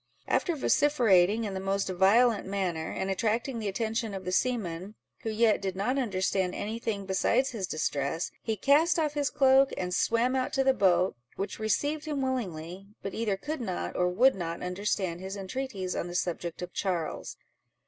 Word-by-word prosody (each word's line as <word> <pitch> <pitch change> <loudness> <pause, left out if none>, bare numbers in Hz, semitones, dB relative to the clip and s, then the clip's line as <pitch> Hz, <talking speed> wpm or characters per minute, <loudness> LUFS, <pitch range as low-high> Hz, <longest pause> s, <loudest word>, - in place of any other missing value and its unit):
After 345 - +1
vociferating 230 - +3
in 205 -3 -3
the 190 - -3
most 195 +1 -1
violent 200 +5 +3
manner, 180 -5 -2
and 190 0 -2
attracting 230 +5 -1
the 215 - -3
attention 220 +1 -2
of 190 -1 -7
the 185 - -2
seamen, 195 -3 -1 0.2
who 225 - -4
yet 220 -1 +3
did 190 -1 -3
not 245 +8 0
understand 190 -5 0
any 220 +3 -4
thing 205 -4 -3
besides 195 +7 +1
his 205 -6 -3
distress, 155 +1 -2
he 220 - -1
cast 300 - +4
off 305 -3 +1
his 290 -2 0
cloak, 270 0 +5
and 180 -1 -2
swam 235 +6 +2
out 255 -1 -1
to 270 - +2
the 265 0 +4
boat, 185 -5 +3 0.2
which 195 - -4
received 290 - 0
him 300 -2 -2
willingly, 190 -8 -4 0.2
but 195 - -4
either 215 -4 -1
could 295 +6 -4
not, 85 - -3
or 180 - +2
would 245 +9 +5
not 170 -2 -4
understand 180 -1 -2
his 190 +1 -5
entreaties 195 -2 -4
on - - -2
the 175 - -7
subject 175 -1 -2
of 180 - -7
Charles. 175 -5 -3
200 Hz, 180 wpm, -29 LUFS, 185-245 Hz, 0.2 s, cloak